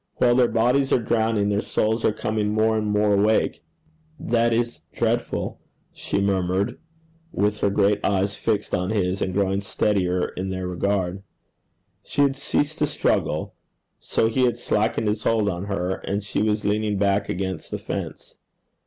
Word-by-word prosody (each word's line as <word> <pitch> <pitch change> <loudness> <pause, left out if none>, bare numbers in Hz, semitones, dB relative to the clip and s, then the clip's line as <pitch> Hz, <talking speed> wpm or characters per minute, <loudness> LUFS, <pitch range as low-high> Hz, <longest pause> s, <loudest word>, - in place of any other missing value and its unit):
While 120 -1 +3
their 125 0 +4
bodies 125 +5 +2
are - - +5
drowning, 110 -2 +1
their 100 0 +1
souls 110 +1 0
are - - +4
coming 105 0 -1
more 110 +1 +2
and 110 -1 -1
more 105 0 +2
awake.' 105 +2 +2 0.6
'That 115 0 +1
is 120 +1 -1
dreadful,' 120 +1 -1 0.3
she - - -2
murmured, 100 +3 0 0.5
with 105 +1 0
her 100 - +2
great 100 +1 +2
eyes 100 0 +1
fixed 110 -3 -1
on 90 +1 0
his, 95 -3 0
and 95 - 0
growing 95 +1 0
steadier 90 -3 0
in 95 +1 -5
their 95 -1 -3
regard. 95 +1 -1 0.8
She 145 - +1
had 135 -1 +2
ceased 145 +3 -1
to 150 - +2
struggle, - - 0 0.5
so 110 - 0
he 125 +3 +2
had 120 -1 +1
slackened 110 -1 0
his 105 +1 0
hold 110 -2 +1
of 90 -1 -2
her, 95 -2 -2
and 100 +1 -3
she 100 - -2
was 105 0 0
leaning 105 0 0
back 100 0 +1
against 95 0 -3
the - - -3
fence. - - -6
105 Hz, 165 wpm, -23 LUFS, 100-115 Hz, 0.8 s, are